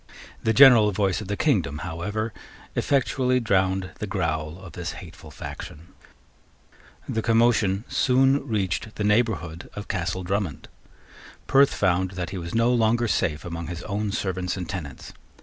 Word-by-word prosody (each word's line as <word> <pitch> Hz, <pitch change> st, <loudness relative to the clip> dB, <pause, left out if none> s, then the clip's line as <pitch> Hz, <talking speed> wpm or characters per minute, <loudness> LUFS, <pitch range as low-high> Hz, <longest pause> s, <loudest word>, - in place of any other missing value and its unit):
The 110 Hz, -, +1 dB
general 115 Hz, -4 st, +7 dB
voice 95 Hz, 0 st, 0 dB
of 105 Hz, -, -7 dB
the 100 Hz, +1 st, -2 dB
kingdom, 70 Hz, +2 st, +1 dB
however, 105 Hz, +6 st, -3 dB, 0.4 s
effectually 130 Hz, -2 st, +1 dB
drowned 95 Hz, -4 st, +1 dB
the 105 Hz, -, -3 dB
growl 80 Hz, -4 st, -2 dB
of 95 Hz, -2 st, -11 dB
this -, -, -5 dB
hateful -, -, -11 dB
faction. 80 Hz, +4 st, -9 dB, 1.2 s
The 110 Hz, -, -1 dB
commotion 115 Hz, -3 st, +2 dB
soon 135 Hz, +2 st, +2 dB
reached 105 Hz, -1 st, -2 dB
the 105 Hz, -, -3 dB
neighbourhood 105 Hz, -7 st, 0 dB
of 100 Hz, -, -6 dB
Castle 95 Hz, 0 st, -2 dB
Drummond. 95 Hz, -5 st, -3 dB, 0.8 s
Perth 140 Hz, 0 st, +4 dB
found 95 Hz, -1 st, +1 dB
that 90 Hz, +1 st, -3 dB
he 95 Hz, -, -4 dB
was 85 Hz, +2 st, -6 dB
no 115 Hz, +2 st, +3 dB
longer 120 Hz, 0 st, +2 dB
safe 75 Hz, -7 st, 0 dB
among 85 Hz, -1 st, -5 dB
his 85 Hz, +1 st, -6 dB
own 105 Hz, 0 st, -2 dB
servants 95 Hz, -2 st, -2 dB
and 90 Hz, -2 st, -5 dB
tenants. 80 Hz, -7 st, -7 dB
100 Hz, 150 wpm, -25 LUFS, 90-115 Hz, 1.2 s, general